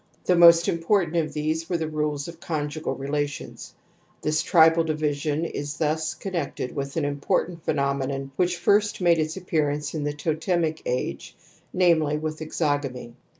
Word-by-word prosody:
The 180 - +4
most 170 0 +7
important 170 0 +1
of 160 -2 0
these 155 +2 -2
were 175 - +1
the 160 -1 -2
rules 150 -2 -2
of 170 -1 -10
conjugal 155 -1 -3
relations. 145 +1 -4 0.5
This 155 0 +1
tribal 165 -1 +5
di 160 -1 -1
vision 150 +1 -1
is 145 -2 -5
thus 155 0 -1
connected 170 -9 -4
with 140 0 -4
an 155 - +1
important 165 +4 -1
phe - - 0
nomenon 140 -1 -1
which 180 +1 +1
first 210 +3 +2
made 170 -2 +3
its 155 +3 -2
appearance 150 -5 -1
in 155 -2 -3
the 145 0 -1
totemic 160 +1 -1
age, 125 - -3 0.4
namely 160 -5 +3
with 155 0 -4
exogamy." 145 -6 -2
155 Hz, 155 wpm, -25 LUFS, 145-170 Hz, 0.5 s, most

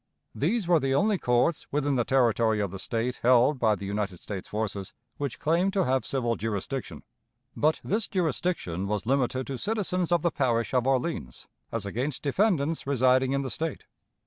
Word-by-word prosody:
These 185 - 0
were 170 -2 +5
the 135 -1 0
only 205 +3 +2
courts 125 +6 +1
within 145 -1 +1
the 120 - +2
territory 115 -4 +2
of 100 -3 -1
the 95 - -7
State 120 +4 -2
held 125 +3 +4
by 110 -3 +3
the 100 - -7
United 100 -2 -2
States 95 +1 -7
forces 105 -3 -3 0.2
which 140 -3 -3
claimed 170 +5 +1
to 195 -2 +2
have 130 -3 0
civil 120 -4 0
jurisdiction. 115 +5 -4 0.5
But 155 +1 +2
this 210 +2 -1
jurisdiction 160 - -1
was 105 -1 -2
limited 130 0 +1
to 135 - -4
citizens 185 -5 -1
of 175 -2 +3
the 170 - +2
parish 120 -5 0
of 125 0 +2
Orleans 130 - -1 0.3
as 115 -3 -3
against 125 +7 -3
defendants 160 -2 +1
residing 130 0 +3
in 140 0 0
the 130 - -4
State. 160 -2 -3
130 Hz, 175 wpm, -27 LUFS, 115-160 Hz, 0.5 s, were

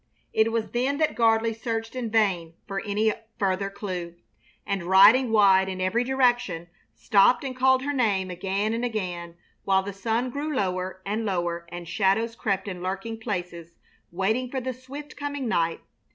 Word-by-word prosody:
It 220 +1 +3
was 225 -1 -2
then 260 +4 0
that 310 0 +1
Gardley 225 -1 +3
searched 225 +1 -4
in 245 -3 -3
vain 190 -7 +1
for 195 -1 -3
any 210 +1 +1 0.2
further 195 0 0
clue, 180 -4 -5 0.5
and, 200 -2 -1
riding 210 +7 +7
wide 195 -3 +5
in 185 -1 -5
every 185 +6 +1
direction, 245 -10 +1 0.3
stopped 240 +4 +4
and 260 -2 -4
called 260 0 +3
her 290 +1 -1
name 200 -8 +1
again 195 +4 -1
and 230 +1 -2
again, 180 -7 -3 0.3
while 190 -1 +2
the 200 +1 -5
sun 230 +5 -1
grew 290 +3 -3
lower 185 -3 -2
and 210 +3 -2
lower 175 -4 -2
and 175 -1 -7
shadows 205 +5 +1
crept 200 -4 -1
in 180 -3 -5
lurking 195 +5 -4
places 175 -6 -5 0.3
waiting 220 +8 0
for 265 - -2
the 260 0 -3
swift 275 +4 -10
coming 285 -2 -4
night. 165 -6 0
210 Hz, 165 wpm, -26 LUFS, 185-240 Hz, 0.5 s, riding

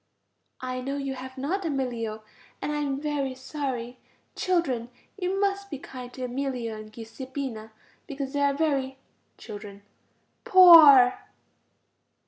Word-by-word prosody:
I 255 0 -4
know 275 +2 -3
you 275 -1 -3
have 260 0 -9
not, 340 +9 -2
Emilio, 240 -8 -3 0.4
and - - -3
I 300 - -2
am 280 -2 -2
very 285 -3 -2
sorry. 260 -3 -5 0.4
Children, 270 -11 0 0.3
you 380 0 -2
must 400 0 -1
be 285 - -5
kind 255 -2 -10
to 255 - -7
Emilio 250 -3 -3
and 215 0 -10
Giuseppina, 235 0 -7 0.4
because 275 -1 -5
they 285 - -1
are 280 -1 +2
very... 275 -4 -1 0.4
Children. 205 -2 -10 0.6
Poor. 330 - +8
270 Hz, 125 wpm, -26 LUFS, 245-295 Hz, 0.6 s, Poor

